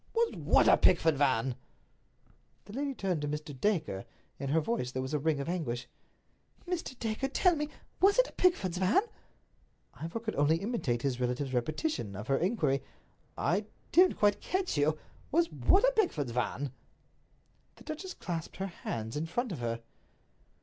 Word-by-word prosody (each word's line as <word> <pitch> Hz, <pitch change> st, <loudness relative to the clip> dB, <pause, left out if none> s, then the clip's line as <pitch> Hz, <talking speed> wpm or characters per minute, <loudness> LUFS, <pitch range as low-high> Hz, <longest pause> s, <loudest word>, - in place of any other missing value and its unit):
"Was 460 Hz, 0 st, +2 dB
what -, -, +3 dB
a -, -, +7 dB
Pickford's 160 Hz, -5 st, +4 dB
van?" 130 Hz, -3 st, +2 dB, 1.1 s
The 205 Hz, -, -11 dB
lady 275 Hz, +2 st, -2 dB
turned 185 Hz, -8 st, -1 dB
to 150 Hz, -, -2 dB
Mr. 150 Hz, 0 st, -4 dB
Dacre. 155 Hz, -, 0 dB, 0.4 s
In 140 Hz, 0 st, -3 dB
her 160 Hz, +3 st, +3 dB
voice 155 Hz, -, -1 dB
there 130 Hz, -, -2 dB
was 130 Hz, -, -5 dB
a 150 Hz, -, +2 dB
ring 155 Hz, 0 st, +1 dB
of 140 Hz, -, -3 dB
anguish. 140 Hz, -9 st, -2 dB, 0.8 s
"Mr. 340 Hz, -8 st, -3 dB
Dacre, 225 Hz, +4 st, -1 dB
tell 355 Hz, +5 st, +3 dB
me, 300 Hz, -1 st, -2 dB, 0.3 s
was 400 Hz, +4 st, +5 dB
it -, -, +5 dB
a -, -, -11 dB
Pickford's 190 Hz, -, +2 dB
van?" 195 Hz, -, +4 dB, 0.9 s
Ivor 165 Hz, +7 st, -5 dB
could 225 Hz, -1 st, -4 dB
only 145 Hz, +3 st, +4 dB
imitate 165 Hz, -, -1 dB
his 130 Hz, -3 st, 0 dB
relative's 125 Hz, +2 st, -1 dB
repetition 125 Hz, -, -1 dB
of 105 Hz, +5 st, -7 dB
her 135 Hz, -, +3 dB
inquiry. 175 Hz, -, +1 dB, 0.6 s
"I 200 Hz, +5 st, +1 dB, 0.3 s
don't 365 Hz, +2 st, +5 dB
quite 205 Hz, -1 st, +3 dB
catch 375 Hz, 0 st, -1 dB
you—was 155 Hz, -, 0 dB
what 390 Hz, -, +3 dB
a -, -, +4 dB
Pickford's 155 Hz, -, +1 dB
van?" 125 Hz, +3 st, -2 dB, 1.0 s
The -, -, -16 dB
duchess 340 Hz, +4 st, -6 dB
clasped 170 Hz, -3 st, -5 dB
her 190 Hz, -, -2 dB
hands 115 Hz, -, -5 dB
in 155 Hz, +2 st, -2 dB
front 240 Hz, +7 st, -2 dB
of 165 Hz, -, -4 dB
her. 115 Hz, -1 st, -2 dB
165 Hz, 165 wpm, -31 LUFS, -, 1.1 s, a